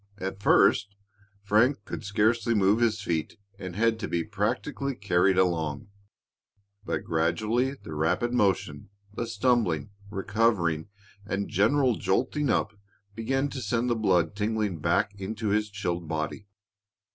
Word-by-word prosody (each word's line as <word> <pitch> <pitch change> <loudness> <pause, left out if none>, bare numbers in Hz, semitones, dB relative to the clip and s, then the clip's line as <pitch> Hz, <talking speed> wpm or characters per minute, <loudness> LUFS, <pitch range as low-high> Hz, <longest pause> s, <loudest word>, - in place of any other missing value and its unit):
At 95 0 -5
first, 100 0 +4 0.5
Frank 105 +3 +2
could - - -6
scarcely 110 +3 +1
move 100 +2 +3
his 110 -3 +1
feet 80 -5 -2 0.2
and 95 -2 -6
had 115 +1 +2
to 100 - -3
be 85 -1 -1
practically 110 - -2
carried 95 -2 +2
along. 80 -3 0 0.9
But - - -3
gradually 110 +11 0
the 80 - -10
rapid 90 +10 0
motion, 95 -9 0 0.2
the 120 +2 -3
stumbling, 115 - +1 0.2
recovering, 100 -6 0 0.4
and 100 0 -3
general 125 +6 +3
jolting 135 +8 0
up 110 - +1 0.4
began 135 +6 -1
to 135 -1 -6
send 120 +2 0
the - - +2
blood 90 -6 +1
tingling 105 -4 -1
back 100 +6 +1
into 110 +2 -3
his 105 +1 +1
chilled 90 -5 -3
body. 80 +6 -4
105 Hz, 135 wpm, -27 LUFS, 90-115 Hz, 0.9 s, first